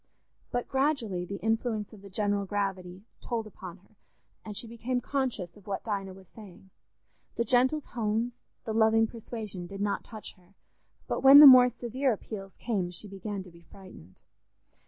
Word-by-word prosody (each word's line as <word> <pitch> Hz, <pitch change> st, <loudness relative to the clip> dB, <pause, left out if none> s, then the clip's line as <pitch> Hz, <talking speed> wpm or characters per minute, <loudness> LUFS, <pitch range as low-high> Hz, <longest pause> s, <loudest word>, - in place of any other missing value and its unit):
But 245 Hz, 0 st, -2 dB
gradually 265 Hz, -10 st, 0 dB
the 200 Hz, +2 st, -6 dB
influence 225 Hz, -1 st, -1 dB
of 205 Hz, -, -13 dB
the 200 Hz, -, -12 dB
general 200 Hz, 0 st, -1 dB
gravity 190 Hz, -2 st, -3 dB, 0.2 s
told 230 Hz, -2 st, -3 dB
upon 190 Hz, -4 st, -10 dB
her, 200 Hz, +3 st, -28 dB, 0.5 s
and 210 Hz, -2 st, -7 dB
she -, -, -5 dB
became 235 Hz, +2 st, -3 dB
conscious 245 Hz, -9 st, -3 dB
of 205 Hz, -1 st, -19 dB
what 195 Hz, -1 st, -3 dB
Dinah 195 Hz, -3 st, -4 dB
was 190 Hz, -1 st, -16 dB
saying. 195 Hz, -2 st, -15 dB, 0.6 s
The 235 Hz, -, 0 dB
gentle 255 Hz, +5 st, +2 dB
tones, 230 Hz, 0 st, -3 dB, 0.3 s
the 220 Hz, -, -3 dB
loving 220 Hz, 0 st, +4 dB
persuasion, 220 Hz, -5 st, -7 dB
did 195 Hz, +2 st, -9 dB
not 205 Hz, 0 st, -1 dB
touch 215 Hz, -2 st, -9 dB
her, 180 Hz, +2 st, -26 dB, 0.5 s
but -, -, -2 dB
when 270 Hz, +1 st, +10 dB
the 300 Hz, -, +12 dB
more 255 Hz, -2 st, +10 dB
severe 250 Hz, +2 st, -1 dB
appeals 195 Hz, -2 st, -8 dB
came 200 Hz, -7 st, -2 dB
she 180 Hz, +4 st, -7 dB
began 195 Hz, 0 st, -6 dB
to 180 Hz, -, -15 dB
be 170 Hz, 0 st, -17 dB
frightened. 170 Hz, -, -15 dB
210 Hz, 170 wpm, -29 LUFS, 195-235 Hz, 0.6 s, the